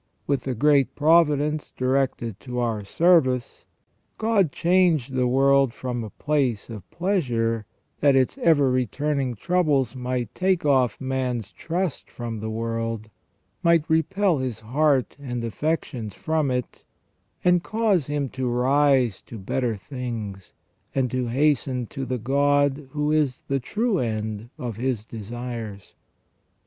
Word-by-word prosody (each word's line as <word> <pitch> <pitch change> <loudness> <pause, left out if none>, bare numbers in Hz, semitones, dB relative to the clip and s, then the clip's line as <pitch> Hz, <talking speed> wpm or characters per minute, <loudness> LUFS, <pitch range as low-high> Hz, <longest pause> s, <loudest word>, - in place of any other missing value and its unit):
With 140 -1 -1
a 130 - -1
great 140 +1 +3
providence 150 -1 +3
directed 130 -5 0
to 125 -2 -6
our 115 -4 -1
service, 130 - +2 0.5
God 215 -8 +2
changed 170 -7 +2
the 125 -1 +2
world 135 0 +3
from 125 -2 -3
a 110 - -6
place 130 -5 -1
of 100 -5 -9
pleasure, 120 - 0 0.3
that 140 -2 +4
its 130 -1 +2
ever 145 -6 +4
returning 130 +2 -1
troubles 145 - +1
might 125 -3 -3
take 185 -3 +1
off" 130 -6 +3
man's 130 -5 -2
trust 170 -1 -3
from 115 -2 -5
the 110 +1 -4
world, 115 -1 -3 0.5
might 170 -2 +3
repel 170 +1 +2
his 125 -4 -3
heart 135 +3 +1
and 120 -4 -4
affections 115 - -2
from 155 -3 0
it, 125 -2 -3 0.6
and 180 -1 +4
cause 210 - +1
him 145 -1 -1
to 130 -1 -2
rise 130 -2 +2
to 115 - -10
better 115 +4 -1
things, 110 -5 -6 0.4
and 130 -2 +1
to 130 -1 -1
hasten 130 -1 +1
to 135 +4 -6
the 130 - -1
God 140 +3 +1
who 150 +1 -1
is 150 -5 +1
the 135 0 -1
true 210 - 0
end 110 -1 -3
of 120 -4 -5
his 120 -3 -2
desires. 115 -2 -7
130 Hz, 135 wpm, -24 LUFS, 120-150 Hz, 0.6 s, that